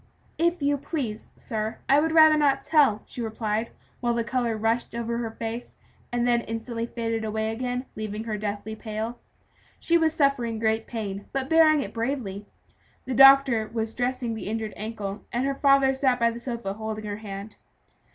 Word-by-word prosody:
"If 340 -1 +1
you 285 0 +2
please, 265 -7 -4
sir, 220 0 -4
I 280 +2 +5
would 320 +2 +1
rather 315 -1 +7
not 285 -3 +2
tell," 280 -9 +3
she 245 - -7
replied, 220 0 -2 0.3
while 240 -1 0
the 235 - 0
color 235 -1 -1
rushed 225 +2 0
over 235 0 -2
her 230 -1 -2
face, 225 +2 -6 0.3
and 240 0 0
then 240 -1 +3
instantly 230 +1 -4
faded 230 -1 -3
away 220 0 -1
again, 250 +2 -3
leaving 215 0 -4
her 220 -2 -3
deathly 210 +1 -4
pale. 220 +2 -5 0.6
She 340 0 +3
was 320 -1 +3
suffering 270 -6 +1
great 220 0 0
pain, 205 -4 -5
but 270 +1 -2
bearing 315 -2 +6
it - - -8
bravely. 225 -5 -3 0.6
The 260 - -3
doctor 270 -4 +7
was 225 -1 -2
dressing 245 -1 -1
the 220 - -6
injured 220 0 -3
ankle, 210 -2 -5
and 245 +2 0
her 275 - 0
father 275 -1 +4
sat 265 -2 +2
by 235 0 +3
the 235 - -7
sofa 235 -5 -4
holding 215 0 -5
her 205 -1 -4
hand. 200 0 -8
235 Hz, 180 wpm, -26 LUFS, 220-265 Hz, 0.6 s, rather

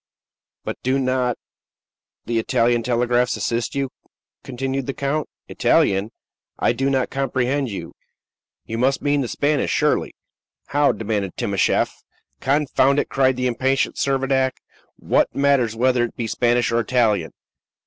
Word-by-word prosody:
"But - - -5
do 130 +2 +1
not 130 -2 0 0.9
the 115 -1 0
Italian 115 +1 +2
telegraphs 120 +1 +1
assist 115 +2 -2
you?" 135 -1 -1 0.5
continued 135 +1 -3
the 135 - -3
count. 140 +2 -2 0.2
"Italian! 95 +2 +2 0.5
I - - +2
do 135 +3 0
not 130 -2 0
comprehend 135 0 -1
you. 100 - -7 0.7
You 115 +1 -4
must 135 +2 +1
mean 145 0 +2
the 125 - -2
Spanish, 145 +4 0
surely." - - +1 0.5
"How?" 145 0 +3
demanded 105 -4 -3
Timascheff. - - +1 0.5
"Confound 140 0 +2
it!" - - 0
cried 130 -1 +2
the 125 0 -2
impatient 130 +3 0
Servadac. 135 -1 +1 0.4
"What - - +1
matters 140 -5 +2
whether 125 +1 +2
it 120 - -9
be 115 - -3
Spanish 120 +1 +1
or 115 - +2
Italian? 110 -7 +1
130 Hz, 135 wpm, -21 LUFS, 120-135 Hz, 0.9 s, How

